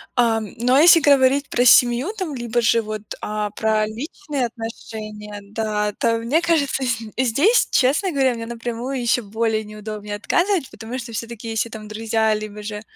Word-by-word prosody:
Ам, 225 -4 +1
но, 245 +2 +1
а 285 - +6
если 340 0 +8
говорить 280 -1 +4
про 245 - +2
семью, 245 - +5
там, 360 -6 -3
либо 240 -2 -2
же 230 0 +3
вот, 215 -1 -5 0.2
а, 210 -1 -3
про 215 0 +1
личные 275 - -4
отношения, 215 -2 -8
да, 210 0 -2
то 230 +2 +1
мне 255 +9 +1
кажется, 290 -5 +1
зд 230 -3 -2
здесь, 285 - +3
честно 290 +9 +2
говоря, 270 -4 +2
мне 230 -1 -6
напрямую 240 +3 -4
ещё 240 0 +1
более 220 +1 -1
неудобнее 210 0 -7
отказывать, 345 - 0
потому 225 +3 -7
что 240 -2 -7
всё-таки, 230 +1 -6
если 225 +1 -1
там 215 -1 -9
друзья 220 0 0
либо 210 0 -5
же 210 0 -5
230 Hz, 170 wpm, -21 LUFS, 215-260 Hz, 0.2 s, если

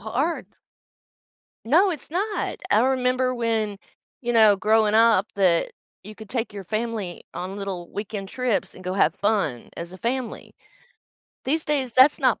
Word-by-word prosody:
hard. 265 +10 -2 1.2
No, 340 - +4
it's 300 -4 -7
not. 405 +5 -2
I 210 - +5
remember 255 0 +1
when, 220 -4 -1 0.4
you 240 -1 -2
know, 220 -3 +6
growing 215 +1 +3
up 225 -3 +5
that 185 -4 +2 0.3
you 215 +2 -10
could 220 -1 -12
take 235 -4 -2
your 200 -2 -7
family 215 -2 -4
on 185 +2 -5
little 190 -3 -5
weekend 205 -1 -5
trips 250 -3 -1
and 185 - -13
go 185 - -2
have 195 - +3
fun 200 - 0
as 170 0 -6
a 185 - -11
family. 245 +1 -4 0.9
These 310 +4 0
days, 275 -5 -1
that's 260 +4 +6
not 255 -3 +2
225 Hz, 155 wpm, -24 LUFS, 200-255 Hz, 1.2 s, know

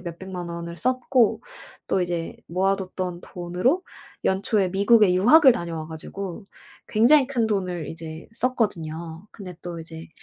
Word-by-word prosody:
몇백만 180 0 -7
원을 170 0 -6
썼고 255 -1 +2 0.5
또 190 - +1
이제 175 -2 -3
모아 190 +3 +1
뒀던 185 -2 -5
돈으로 180 - -1 0.4
연초에 195 0 +1
미국에 200 0 +4
유학을 260 - +7
다녀와 170 -7 -5
가지고 185 +5 -7 0.4
굉장히 255 +6 +6
큰 240 -5 0
돈을 180 -7 -2
이제 160 -1 -8
썼거든요. 170 -8 -2
근데 180 -5 -9
또 175 -1 -6
이제 160 0 -10
185 Hz, 290 characters per minute, -24 LUFS, 170-220 Hz, 0.5 s, 유학을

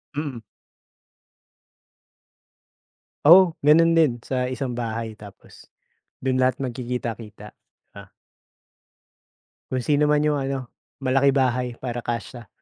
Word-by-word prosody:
Mm. 140 -6 -4 2.8
Oo, 170 +2 +7
gano'n 165 +3 +5
din 150 -8 +3
sa 125 +1 -3
isang 125 -1 -4
bahay, 115 -2 -4
tapos 105 -2 -16 0.5
do'n 130 0 -1
lahat 130 0 +1
magkikita-kita, 120 -4 -6 0.4
ah. - - -12 1.6
Kung 130 -1 -1
sino 145 +4 +2
man 150 0 +3
yung 150 -1 +1
ano 135 -2 -4 0.4
malaki 135 +2 +3
bahay, 125 -2 +1
para 120 -1 -5
kasya. 120 0 -6
130 Hz, 100 wpm, -23 LUFS, 120-140 Hz, 2.8 s, Oo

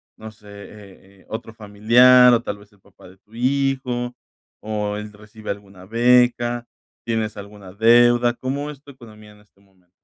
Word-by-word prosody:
no 110 0 -11
sé, 105 -1 -21
eh, 100 -1 -15
eh, - - -26
otro 110 0 -7
familiar, 120 +4 +5
o 120 0 +1
tal 105 - -6
vez, 100 0 -20
el 100 - -27
papá 100 - -19
de 95 - -19
tu 105 +3 -30
hijo, 125 -1 -2 0.5
o 105 -1 -4
¿él 105 0 -8
recibe 105 +1 -13
alguna 100 -2 -8
beca? 120 +1 +1 0.4
¿Tienes 110 -2 -3
alguna 100 -2 -12
deuda? 120 +2 +4
¿Cómo 140 +4 -5
es 145 -1 -12
tu 140 - -14
economía 110 -4 -16
en 105 - -20
este 105 -1 -28
momento? 95 -3 -32
110 Hz, 175 wpm, -20 LUFS, 105-120 Hz, 0.5 s, familiar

